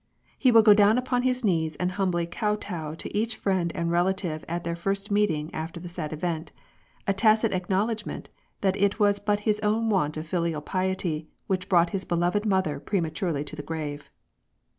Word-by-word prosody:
He 255 - +3
will 225 -1 +7
go 210 -1 +8
down 205 +2 +5
upon 250 0 0
his 255 0 0
knees 160 -6 +1
and 180 0 -1
humbly 180 -3 0
kotow 175 -5 -3
to - - -7
each 220 +2 0
friend 185 -4 0
and 170 0 -1
relative 175 -2 0
at 170 +1 -3
their 170 - -2
first 195 +4 -2
meeting 165 -7 +1
after 165 +2 -5
the 175 - -8
sad 170 -3 -5
event 160 0 -3 0.3
— - - -35
a 200 - +3
tacit 215 +2 +3
acknowledorment 200 +4 -1 0.4
that 190 -1 +2
it 200 +2 +1
was 205 -1 +3
but 205 0 0
his 210 0 +1
own 220 +1 +1
want 155 -6 +1
of 155 - -4
filial 170 -3 -1
piety 185 -3 -2 0.2
which 185 -1 -2
brought 175 -2 +4
his 195 -1 -2
beloved 175 +5 0
mother 185 -8 +1
prematurely 165 -3 -1
to 150 +1 -8
the 150 - -5
grave. 150 -2 -5
185 Hz, 185 wpm, -26 LUFS, 165-205 Hz, 0.4 s, go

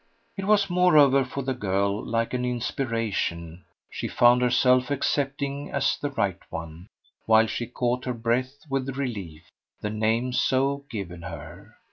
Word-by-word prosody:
It 195 - -4
was 205 -2 +4
moreover, 155 -7 +5
for 130 +2 -5
the 130 +1 -1
girl, 100 -2 -1
like 115 +1 -1
an 125 0 -1
inspiration: 115 -9 -2 0.2
she - - -5
found 120 +1 +4
herself 125 +1 +3
accepting 140 0 -1
as - - +1
the 145 - -1
right 100 -9 -1
one, 80 +2 -7 0.4
while 110 0 +6
she 115 +1 -3
caught 125 +1 -1
her 125 - -1
breath 125 +5 -2
with 135 -1 -2
relief, 100 - -5 0.4
the 105 - -2
name 110 +4 0
so 140 +2 +1
given 90 -6 -6
her. 80 - -10
125 Hz, 145 wpm, -26 LUFS, 110-135 Hz, 0.4 s, while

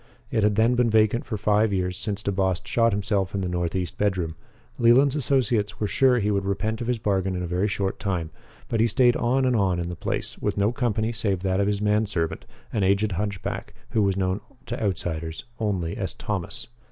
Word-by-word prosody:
And - - +1
it - - +2
had 105 0 +3
then 115 +3 +4
been 120 -1 +3
vacant 110 +1 +3
for 110 - -3
five 105 +1 +2
years 90 -1 -1
since 105 +2 -3
DeBost 95 -2 0
shot 115 -1 +2
himself 100 -1 -1
in 100 - -1
the 95 - -1
northeast 90 0 -2
bedroom. 95 -6 0 0.4
Leland's 130 +4 +5
associates 120 -7 +1
were 105 - 0
sure 125 +4 +3
he 105 -2 +1
would 100 -1 +1
repent 110 +3 -2
of 120 - -3
his 125 -1 +1
bargain 95 -3 0
in 90 - -2
a - - -3
very 90 +4 0
short 100 -2 -2
time, 90 -5 -2 0.4
but 115 - -1
he 115 - +4
stayed 120 0 +4
on 130 +2 +1
and 125 -1 +2
on 95 -5 +2
in 85 0 -3
the 90 - -5
place, - - -3
with - - -1
no 100 +2 +3
company 115 -3 0
save 100 -5 -1
that 95 0 0
of 100 - +2
his 105 0 0
man 105 +1 +2
servant, 85 -5 -2 0.3
an 105 - 0
aged 100 +2 +2
hunch 100 +1 -3
back - - -5 0.2
who 110 - +2
was 100 -1 +1
known 95 +1 0 0.2
to 120 -1 -4
outsiders 85 -5 -2 0.2
only 95 -7 -1
as - - -4
Thomas. - - -4
100 Hz, 220 wpm, -25 LUFS, 95-110 Hz, 0.4 s, Leland's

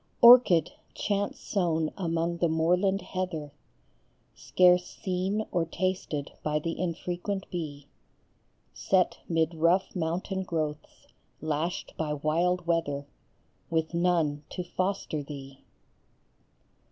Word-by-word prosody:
"JRCHID, 235 -10 +8 0.2
chance 205 -1 -1
sown 165 -5 0
among 170 -2 -1
the 170 -1 +1
moorland 180 +5 +2
heather, 165 -6 -4 0.8
Scarce 180 -1 +4
seen 190 +3 -2
or 175 - +1
tasted 170 -4 -2
by 150 0 0
the 165 +2 -3
infrequent 180 +3 -3
bee, 150 -5 -5 0.9
Set 185 -2 +1
mid 165 0 +1
rough 170 +5 +2
mountain 180 +3 -2
growths, 155 -4 -4 0.3
lashed 155 +3 -2
by 155 -2 -1
wild 170 +5 0
weather, 155 -4 0 0.6
With 160 0 0
none 170 -4 +1
to 180 - -4
foster 185 -3 -2
thee. 140 -2 -9
170 Hz, 105 wpm, -28 LUFS, 155-185 Hz, 0.9 s, JRCHID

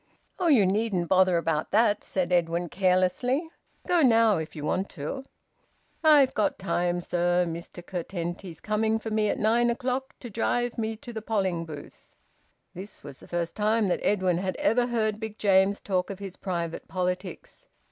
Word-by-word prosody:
"Oh, 360 - +1
you 255 -11 +5
needn't 195 -2 0
bother 185 -2 +4
about 160 -2 -1
that," 210 -1 +3
said 180 -2 -2
Edwin 170 0 +1
carelessly. 190 - +1 0.4
"Go 350 -2 +3
now 230 -5 +5
if 160 0 -5
you 150 - -6
want 190 +5 -1
to." 155 - -4 0.8
"I've 295 -4 +6
got 210 - 0
time, 175 -2 -1
sir. 175 +1 +1
Mr 170 +1 -7
Curtenty's 175 -1 -5
coming 220 +3 0
for 225 0 -6
me 215 -1 +1
at - - -1
nine 235 +3 +3
o'clock 255 +2 -2
to 240 - -7
drive 240 +3 -1
me 220 0 -2
to 235 +2 -10
th' 220 -1 -6
polling 190 -7 -1
booth." 150 -3 -11 0.6
This 195 +4 -10
was 140 -2 -10
the - - -15
first 170 -1 -3
time 215 -1 +2
that - - 0
Edwin 185 -4 +1
had 185 0 -2
ever 240 +3 +2
heard 215 -3 0
Big 220 -1 -6
James 195 0 +3
talk 185 -2 -1
of 195 - -5
his 195 -2 -7
private 170 -3 -4
politics. 180 - -4
195 Hz, 170 wpm, -27 LUFS, 175-225 Hz, 0.8 s, I've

